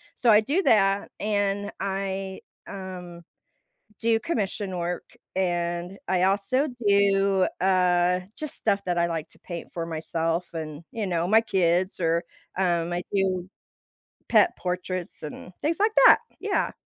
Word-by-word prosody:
So, 240 - +3
I 210 - +8
do 310 - 0
that, 200 - +3
and 205 -1 0
I, 195 0 -3 0.3
um, 180 -3 -8 0.8
do 225 0 +3
commission 205 - -2
work, 175 +1 -2 0.3
and 175 0 -1
I 185 -1 +2
also 205 +9 +1 0.2
do, 195 -1 +4
uh, 180 -1 +3 0.2
just 305 -2 -5
stuff 200 0 0
that 175 -1 0
I 170 - +3
like 165 -1 -3
to - - -19
paint 170 -2 -7
for 170 - -2
myself 165 +1 -2
and, 155 -1 -5
you 220 -3 -2
know, 175 -1 0
my 220 +3 +6
kids, 185 -3 +1
or, 165 0 +1 0.3
um, 175 -2 +1
I 175 - -2
do 190 -2 0 0.8
pet - - +5
portraits, 180 -1 -4
and 155 +4 -8
things 320 +3 0
like 425 +2 +3 0.2
that, - - +8 0.2
yeah. 415 -2 0
190 Hz, 140 wpm, -26 LUFS, 175-200 Hz, 0.8 s, I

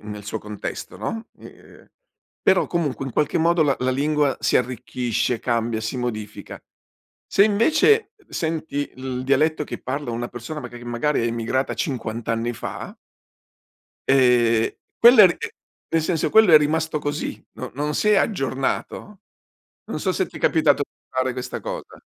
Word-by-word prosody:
nel 105 -1 -8
suo 110 +2 -4
contesto, 105 -1 -7
no, 225 0 -4
i - - -12
ehm, - - -17 0.5
però 190 - +4
comunque 150 -6 -2
in 130 - -6
qualche 150 - +1
modo 165 0 +3
la 140 -2 +2
la 130 +1 0
lingua 145 +1 +1
si - - +3
arricchisce, 125 -1 -1
cambia, 115 -2 -1
si 110 +3 -3
modifica 110 -4 -5 0.7
se 200 - +5
invece, 315 - +3 0.2
senti 160 -3 -3
il 130 -1 -4
dialetto 150 +3 +2
che - - -6
parla 135 0 -3
una 120 +1 -3
persona 120 +6 -7
maga 120 -2 -8
che 120 - -12
magari 120 +3 0
è - - +1
emigrata 115 +3 -1
50 115 -6 -3
anni 115 +1 0
fa - - -7 1.1
ehm, 120 -4 +4 0.3
quella 235 -3 +9
è - - +10
ri 175 - -1 0.5
e - - 0
nel 165 - +2
senso, 160 -1 0
quello 220 -5 +6
è 155 - +11
rimasto 155 +1 0
così, 145 0 -4
no - - -7
non 150 +2 -2
si 210 - +1
è 210 - +5
aggiornato, 180 - -2 0.7
non - - -4
so 190 - 0
se 190 - 0
ti - - -10
capitato 155 -3 +3
di - - -65
fare 130 0 0
questa 125 0 -5
cosa. - - -7
135 Hz, 165 wpm, -23 LUFS, 120-160 Hz, 1.1 s, è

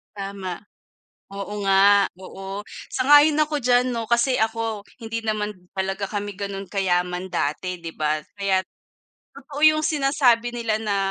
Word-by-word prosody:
Tama. 195 -3 -5 0.7
Oo 200 +1 -7
nga, 200 +1 +5
oo. 195 +2 -8 0.2
Sang-ayon 290 +3 +5
ako 300 -1 -2
diyan 250 0 +3
'no. 230 -2 -3
Kasi 240 +2 +2
ako, 225 -1 -1 0.2
hindi 225 0 -3
naman 210 -1 -1 0.2
talaga 195 +1 -2
kami 205 0 -4
ganun 200 -1 -5
kayaman 180 -2 0
dati 180 +1 -2
'di 165 - -5
ba. 155 -1 -1 0.2
Kaya't 190 -1 +1 0.7
totoo 280 +1 -8
yung 310 0 +3
sinasabi 275 -5 +2
nila 230 -2 0
na 205 -2 0
205 Hz, 135 wpm, -23 LUFS, 195-240 Hz, 0.7 s, nga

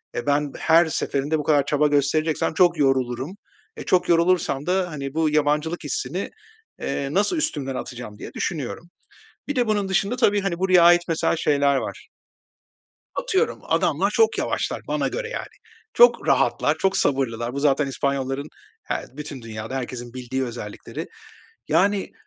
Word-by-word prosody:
eee, 120 - -3
ben 145 0 +1
her 165 +1 +5
seferinde 150 -1 -1
bu - - -3
kadar 145 -2 +3
çaba 150 +1 +2
göstereceksem 150 +3 +1
çok 175 0 +4
yorulurum, 135 0 0 0.5
eee, - - -7
çok 185 - +2
yorulursam 170 -5 +2
da, 180 -1 0
hani, 140 -3 -5
bu 160 0 +1
yabancılık 150 +2 0
hissini, 150 +5 -3 0.5
eee, 140 - -2
nasıl 205 - +1
üstümden 135 - -2
atacağım 120 -5 -7
diye - - -8
düşünüyorum. 165 +1 -4 0.6
Bir 290 - -2
de 245 -2 +1
bunun 205 -2 0
dışında 195 +4 +1
tabii, 205 -5 +2
hani, 190 -3 -2
buraya 185 -2 +5
ait 175 0 +7
mesela 165 0 +1
şeyler 140 -2 +2
var. - - -5 1.1
Atıyorum, 455 -2 0
adamlar - - +1
çok 450 -1 +2
yavaşlar - - -1
bana - - 0
göre, - - -4
yani. - - -5 0.5
Çok 485 - +5
rahatlar, - - +2
çok 190 0 +1
sabırlılar. 125 -6 0
Bu 140 - -3
zaten 145 0 +2
İspanyolların, 135 +1 -2 0.3
her - - -3
bütün 145 -3 -7
dünyada 110 +2 -6
herkesin 120 -1 -6
bildiği 130 +1 -3
özellikleri. 115 -4 -7 0.6
Yani, 200 +1 +2
150 Hz, 150 wpm, -23 LUFS, 135-180 Hz, 1.1 s, ait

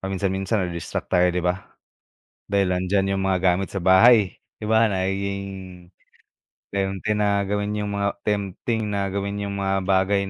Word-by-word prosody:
paminsan-minsan 95 +1 -1
na-distract 85 +2 -5
tayo 90 0 +4
'di 90 0 -1
ba? 90 +2 -1 0.8
Dahil 100 -2 +2
nandiyan 95 +2 0
yung 95 - -1
mga 95 -1 +1 0.2
gamit 95 +1 -3
sa 95 - -3
bahay 95 +2 +5 0.2
di 105 - -6
ba, 110 0 +4
nagiging 100 +1 -2 1.2
tempti 95 +1 -2
na 100 -1 +2
gawin 105 +1 -2
yung 105 -1 -2
mga 100 0 -2
tempting 105 +2 -2
na 100 -1 -1
gawin 100 +1 -3
yung 100 0 -4
mga 95 0 0
bagay 95 +1 +1
100 Hz, 150 wpm, -23 LUFS, 95-100 Hz, 1.2 s, bahay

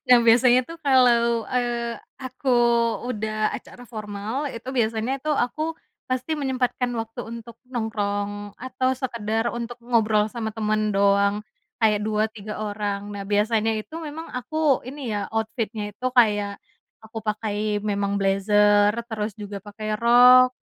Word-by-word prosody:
Nah 250 -1 +8
biasanya 240 +2 +5
tuh 330 +6 -10
kalau, 240 -5 +4
eee, 240 -2 -1 0.2
aku 260 +1 -6 0.6
udah 215 -1 -1
acara 245 - -9
formal, 220 +3 -5
itu 230 +2 -8
biasanya 230 +1 0
tuh 300 +2 -1
aku 310 +6 -1 0.3
pasti 255 +5 -2
menyempatkan 255 -2 -1
waktu 225 -1 -4
untuk 230 0 -9
nongkrong 205 -4 -3
atau 255 +1 -1
sekedar 230 -3 -2
untuk 240 0 -5
ngobrol 220 -3 +2
sama 220 -2 -4
temen 215 -1 0
doang, 200 +1 +3 0.4
kayak 215 -1 +4
2 215 0 +1
3 215 0 -7
orang. 205 -1 -3
Nah 200 -1 -6
biasanya 215 +2 +1
itu 215 +8 -6
memang 320 0 -7
aku 275 +2 0
ini 265 -2 -6
ya 205 -1 -2
outfit-nya 220 -1 -2
itu 250 +5 -5
kayak 210 -4 +2 0.4
aku 220 +1 -8
pakai 210 -1 -1
memang 200 -1 -1
blazer 205 +1 +4 0.2
terus 215 -2 -3
juga 205 -1 -7
pakai 215 +1 -5
rok 250 +2 +7
220 Hz, 135 wpm, -24 LUFS, 210-250 Hz, 0.6 s, Nah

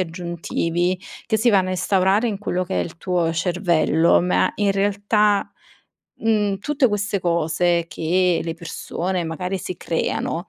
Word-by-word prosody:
aggiuntivi, 175 0 -2 0.3
che 220 - +1
si 230 +3 +3
vanno 190 -3 +3
a - - -1
instaurare 190 +4 +2
in 210 -3 -2
quello 185 -3 -2
che 190 - -1
è - - +1
il 165 - -8
tuo 175 -1 0
cervello, 170 -2 +2
ma 180 +1 +2
in 205 -1 +2
realtà, 205 +1 +1 0.7
mhmm, 210 -3 +1
tutte 275 +4 +1
queste 205 -2 -1
cose 170 0 +1
che 180 +1 +1
le 165 0 -4
persone 175 +2 -4
magari 180 +4 -3
si 185 -1 -6
creano 170 +1 -2
185 Hz, 150 wpm, -22 LUFS, 170-200 Hz, 0.7 s, si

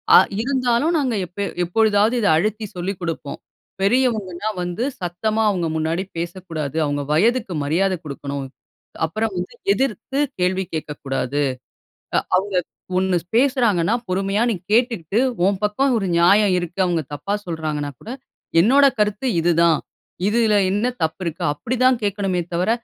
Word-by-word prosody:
அ - - +11 0.2
இருந்தாலும் 260 +4 +1
நாங்க 255 -5 0
எப்ப 190 +3 -4 0.2
எப்பொழுதாவது 215 +4 +3
இத 205 - +2
அழுத்தி 215 +4 -1
சொல்லிக் 180 +2 -3
குடுப்போம். 165 -4 -4 0.4
பெரியவங்கன்னா 215 -3 +1
வந்து 175 +6 -3 0.2
சத்தமா 215 +6 -1
அவங்க 180 -4 0
முன்னாடி 160 +3 -1
பேசக்கூடாது, 165 -4 -5
அவங்க 145 0 -1
வயதுக்கு 220 +4 +2
மரியாத 180 +7 +1
குடுக்கணும், 140 -1 -5 0.6
அப்புறம் 215 +7 -2
வந்து 180 +4 -4 0.2
எதிர்த்து 265 +3 -2 0.2
கேள்வி 185 +1 +1
கேட்கக்கூடாது, 145 -3 -3 0.8
அ - - +5 0.2
அவங்க 195 +1 -1 0.4
ஒண்ணு 190 -1 +1 0.2
பேசுறாங்கன்னா 235 -8 +3
பொறுமையா 195 +3 0
நீ - - 0 0.2
கேட்டுட்டு 225 - +1 0.3
உன் 195 -1 +1
பக்கம் 260 +6 +2
1 195 - -2
நியாயம் 195 +3 +5
இருக்கு, 175 +1 -6
அவங்க 170 -2 0
தப்பா 195 +8 -3
சொல்றாங்கனா 155 -3 -3
கூட 225 - -9 0.5
என்னோட 275 +9 +6
கருத்து 210 +4 0
இது 175 +1 +3
தான். 165 -3 +4 0.5
இதுல 220 -1 +3
என்ன 205 +5 +1 0.2
தப்பு 160 +4 -1
இருக்கு 165 -2 -4
அப்டி 235 +11 -3
தான் 255 0 +5
கேட்கணுமே 195 -3 0
தவர, 180 +5 +1
195 Hz, 135 wpm, -21 LUFS, 170-220 Hz, 0.8 s, அ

